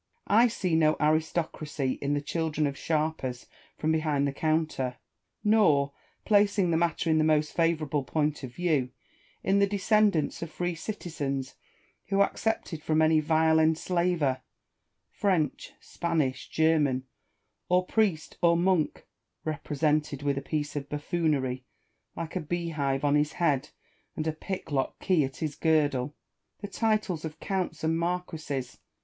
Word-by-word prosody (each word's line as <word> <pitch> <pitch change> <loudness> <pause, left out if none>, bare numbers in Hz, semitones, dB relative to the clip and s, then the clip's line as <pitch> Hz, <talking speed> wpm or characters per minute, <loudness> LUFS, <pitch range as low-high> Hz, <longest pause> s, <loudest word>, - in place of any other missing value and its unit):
I 230 +4 +5
see 190 -6 -2
no 155 -1 +3
aristocracy 155 -3 0
in 140 +1 0
the 145 - -2
children 155 -1 -1
of 140 -1 -2
sharpers 150 -6 -2 0.3
from 155 - 0
behind 155 -3 +1
the 140 - -2
counter, 155 -5 -1 0.5
nor, 165 -11 +4 0.3
placing 200 -3 +3
the 160 - +3
matter 165 -1 +1
in 155 - +3
the - - +3
most 155 -1 +2
favourable 155 -4 +1
point 150 +2 -1
of 130 -3 -7
view, 150 -5 0 0.5
in 195 +1 +3
the 200 - +4
descendants 205 -3 +2
of 170 - -4
free 175 +2 -2
citizens 145 -8 -4 0.5
who 195 +1 +4
accepted 200 -7 -2
from 155 0 +1
any 160 0 +5
vile 160 +1 +3
enslaver 160 -3 +1 0.4
— - - -52
French, 175 -9 0
Spanish, 155 -6 -2
German, 150 -5 +2 0.7
or 180 +1 +3
priest, 195 -7 0
or 170 -1 +5
monk 175 -3 +1 0.4
(represented 150 -1 -1
with 140 -1 +1
a 140 - -3
piece 145 0 -3
of 140 -1 -4
buffoonery, 145 -4 -1 0.5
like 165 +1 -5
a 185 - 0
beehive 150 -4 -2
on 145 - +3
his 150 +1 +2
head 150 -5 +1 0.5
and 155 - -3
a 160 - 0
pick 185 +2 -6
lock 135 -2 -1
key 180 -5 +2
at 135 0 -4
his 155 -3 -3
girdle) 145 -4 +1 0.2
— - - -54
the 205 - -4
titles 215 -7 0
of 160 0 -6
counts 190 -4 -3
aiid 160 +1 +2
marquises. 165 -6 -3
155 Hz, 145 wpm, -28 LUFS, 145-175 Hz, 0.7 s, I